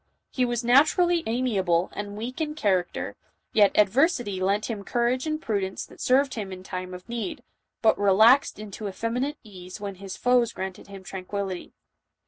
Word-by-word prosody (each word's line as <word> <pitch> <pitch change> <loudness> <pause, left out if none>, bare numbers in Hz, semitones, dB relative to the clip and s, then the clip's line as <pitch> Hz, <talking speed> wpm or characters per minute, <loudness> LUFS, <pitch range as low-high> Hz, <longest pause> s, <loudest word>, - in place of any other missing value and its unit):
He 255 - +1
was 240 0 -2
naturally 320 +8 +4
amiable 195 -8 +1
and 205 0 -6
weak 245 +7 -5
in 300 -1 -2
character, 185 - -1 0.4
yet 205 -2 +4
adversity 210 - +2
lent 200 +3 +1
him 215 -4 -4
courage 245 +5 0
and 310 0 -1
prudence 200 -8 -2
that - - -15
served 265 +1 +3
him 205 -4 -5
in 185 0 -8
time 185 -1 -5
of 180 - -12
need, 240 +4 -4 0.4
but 220 - +4
relaxed 220 +7 +5
into 210 0 -7
effeminate 245 +9 -2
ease 185 -3 -10
when 200 -1 -5
his 195 -1 -7
foes 245 -2 +3
granted 190 -1 -6
him 195 -1 -10
tranquillity. 190 0 -5
215 Hz, 160 wpm, -26 LUFS, 190-250 Hz, 0.4 s, relaxed